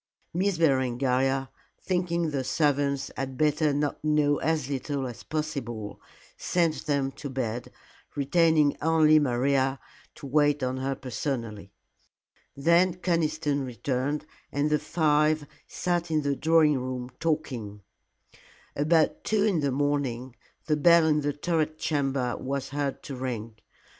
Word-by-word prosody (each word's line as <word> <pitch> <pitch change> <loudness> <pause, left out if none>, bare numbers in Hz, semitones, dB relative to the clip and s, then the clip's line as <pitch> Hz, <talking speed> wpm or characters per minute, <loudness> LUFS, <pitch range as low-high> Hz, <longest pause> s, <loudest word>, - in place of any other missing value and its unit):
Miss 185 +1 0
Berengaria, 135 -2 +1 0.3
thinking 170 -3 -1
the 135 -2 -1
servants 140 -1 0
had 135 -1 -4
better 150 +1 +2 0.3
know 150 -1 +2
as 155 -4 0
little 140 0 -3
as 120 -3 -7
possible, 135 -9 -4 0.3
sent 170 -3 0
them 140 -2 0
to 140 - -8
bed, 120 -3 -4 0.4
retaining 155 +1 +3
only 155 -1 +5
Maria 135 0 +1 0.4
to - - -10
wait 145 0 +2
on 130 0 -1
her 135 +1 -2
personally. 115 -6 -4 0.9
Then 170 +5 +3
Conniston 160 -5 0
returned, 130 +4 -2 0.3
and 145 +2 0
the 150 - +3
five 155 -1 +2 0.2
sat 175 -1 -1
in 155 -2 +1
the 140 0 0
drawing 155 -2 +3
room 125 0 -5
talking. 120 -11 -3 0.9
About 155 +2 +2
two 215 -2 +1
in 200 -6 +2
the 140 -2 0
morning 130 -3 -1 0.3
the 150 -2 +1
bell 170 +1 +6
in 150 -1 +2
the 145 0 0
turret 155 +1 -1
chamber 135 -5 -1
was 135 0 -3
heard 140 -1 -3
to 140 - -6
ring. 115 -4 -5
145 Hz, 130 wpm, -27 LUFS, 130-155 Hz, 0.9 s, bell